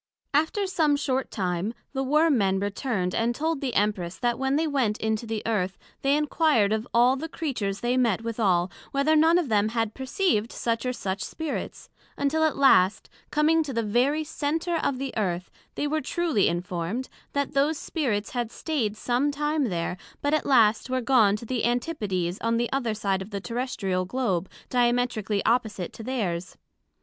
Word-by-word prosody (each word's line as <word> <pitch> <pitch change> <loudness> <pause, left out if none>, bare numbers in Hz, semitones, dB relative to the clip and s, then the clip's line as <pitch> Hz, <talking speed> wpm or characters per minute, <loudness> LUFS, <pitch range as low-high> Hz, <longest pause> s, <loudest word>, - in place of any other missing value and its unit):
After 320 +8 +2
some 320 -6 +2
short 265 -2 -1
time, 185 +3 -2 0.2
the 270 - -1
Worm 300 +3 +3
men 195 -4 +2
returned, 200 -2 -2
and 235 +1 0
told 315 +1 -1
the 260 -4 -2
Empress, 195 -4 0
that 240 -1 0
when 265 +1 +1
they 320 +2 +2
went 260 -8 0
into 220 +1 -2
the 220 -1 -3
Earth, 195 -4 -1 0.2
they 275 +1 +3
inquired 300 -8 +2
of 220 +2 -2
all 245 +2 +4
the 315 +4 -5
Creatures 225 - -3
they 245 +1 +1
met 230 -4 +2
withal, 195 -6 +1 0.2
Whether 280 +3 +2
none 325 +2 +5
of 350 -5 0
them 215 -2 +2
had 225 -1 -1
perceived 265 - 0
such 230 +1 -2
or - - +1
such 195 -4 -3
Spirits; 320 -2 -5 0.3
until 290 +3 +1
at 315 - 0
last 200 -9 +4 0.2
coming 310 +2 +3
to 290 -4 -4
the 230 -1 0
very 255 +9 +2
Center 320 +3 -2
of 280 -4 0
the 270 0 -4
Earth, 185 -4 -2 0.2
they - - -1
were 310 +1 0
truly 315 - +1
informed, 175 +7 -2 0.3
that 280 -1 -1
those 290 +3 +2
Spirits 230 - -2
had 240 -2 -2
stayed 235 -10 -2
some 250 +5 +1
time 295 0 0
there, 180 -3 -2 0.3
but 285 +1 +1
at 310 - +1
last 230 -3 +4
were 255 0 0
gone 230 -6 +4
to 215 - -7
the 245 0 -2
Antipodes 210 - -1
on 230 0 +1
the 235 +1 -1
other 240 -5 0
side 195 -2 -1
of 190 - -7
the 200 -2 -4
Terrestrial 215 -5 -2
Globe, 190 -5 -1 0.2
diametrically 240 -4 +1
opposite 220 -6 0
to - - -9
theirs. 200 -8 -3
240 Hz, 180 wpm, -26 LUFS, 205-285 Hz, 0.3 s, none